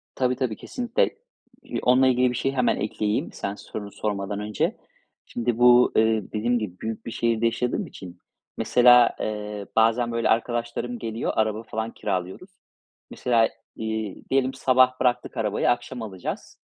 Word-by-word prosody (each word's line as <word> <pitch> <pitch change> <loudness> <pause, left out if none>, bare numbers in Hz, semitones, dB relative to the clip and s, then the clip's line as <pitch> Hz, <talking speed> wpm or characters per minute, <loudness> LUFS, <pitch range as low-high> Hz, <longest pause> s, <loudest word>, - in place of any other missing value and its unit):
Tabii, 125 -1 +1
tabii. 125 -5 -2
Kesinlikle. 240 - -1 0.5
İii, - - -4
onunla 130 +1 +5
ilgili 125 0 +3
bir - - -4
şey 135 - 0
hemen 125 -2 +1
ekleyeyim 105 0 -2
sen 100 +1 -4
sorunu 105 -1 -8
sormadan 100 -1 -3
önce. 105 -1 -1 0.5
Şimdi 120 -1 -2
bu, 125 0 +6
eee, 110 -1 +3
dediğim 120 +3 +1
gibi 95 -4 -6
büyük 110 0 -5
bir - - -5
şehirde 115 0 0
yaşadığım 120 +1 -1
için, 90 -2 -11 0.4
mesela, 125 -1 +5
eee, 105 -1 -4
bazen, 115 +2 +3
böyle, 115 0 0
arkadaşlarım 120 +1 -1
geliyor, 115 0 -3
araba 110 0 0
falan 110 +1 -4
kiralıyoruz. 95 - -4 0.6
Mesela, 115 -2 +2 0.3
iii, 110 -2 -4
diyelim 135 -1 +1
sabah 130 0 +3
bıraktık 125 -1 0
arabayı, 105 -2 +1
akşam 120 0 -3
alacağız. 95 -5 -6
115 Hz, 145 wpm, -25 LUFS, 105-125 Hz, 0.6 s, bu